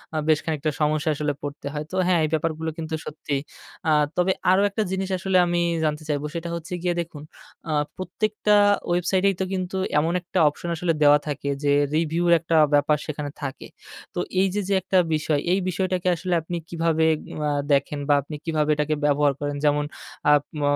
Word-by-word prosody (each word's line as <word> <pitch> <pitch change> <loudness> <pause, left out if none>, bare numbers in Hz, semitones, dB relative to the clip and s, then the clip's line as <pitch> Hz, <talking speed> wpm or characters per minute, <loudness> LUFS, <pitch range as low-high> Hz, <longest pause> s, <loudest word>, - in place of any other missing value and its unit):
আ - - 0
বেশ 155 -2 +4
খানিকটা 155 -1 -1
সমস্যায় 155 +1 +1
আসলে 150 -1 -1
পড়তে 145 0 -6
হয়। 150 0 -3
তো - - -4
হ্যাঁ, 180 -2 +3
এই - - -2
ব্যাপারগুলো 160 0 -1
কিন্তু 160 -1 -5
সত্যি। 150 -1 -4 0.5
আ - - +4 0.3
তবে 180 +1 +3 0.2
আরো 190 +1 +4
একটা 210 +2 -1
জিনিস 190 0 -2
আসলে 185 +1 +1
আমি 175 0 0 0.2
জানতে 155 0 -1
চাইব। 145 -1 0
সেটা 170 0 -4
হচ্ছে 170 +1 -7
গিয়ে 175 0 0
দেখুন 160 -3 -9 0.5
আ - - 0 0.3
প্রত্যেকটা 210 +3 0 0.3
ওয়েবসাইটেই 185 +3 +2
তো - - +1
কিন্তু 185 0 -3 0.2
এমন 165 +3 0
একটা 175 - -5
অপশন 170 +3 -7
আসলে 165 0 0
দেওয়া 145 0 +7
থাকে। 140 -1 -3
যে 145 - +3 0.2
review 165 +1 0 0.2
একটা 165 +1 -1 0.2
ব্যাপার 145 +1 +4
সেখানে 150 -1 -4
থাকে। 135 -2 -5 0.5
তো - - -1 0.2
এইযে 195 0 +1
যে - - +2
একটা 190 - +1 0.2
বিষয়, 155 -1 0
এই 190 - +3
বিষয়টাকে 185 0 -1
আসলে 180 +2 -3
আপনি 170 +2 -4
কিভাবে 165 -1 +1 0.4
আ - - +1 0.2
দেখেন 140 +1 +1
বা - - +6
আপনি 145 +2 -8
কিভাবে 155 -2 0
এটাকে 150 +1 0
ব্যবহার 145 -1 +3
করেন? 145 0 -2
যেমন 145 0 +2 0.4
আ - - +7 0.3
ম - - -3
160 Hz, 185 wpm, -24 LUFS, 150-180 Hz, 0.5 s, দেওয়া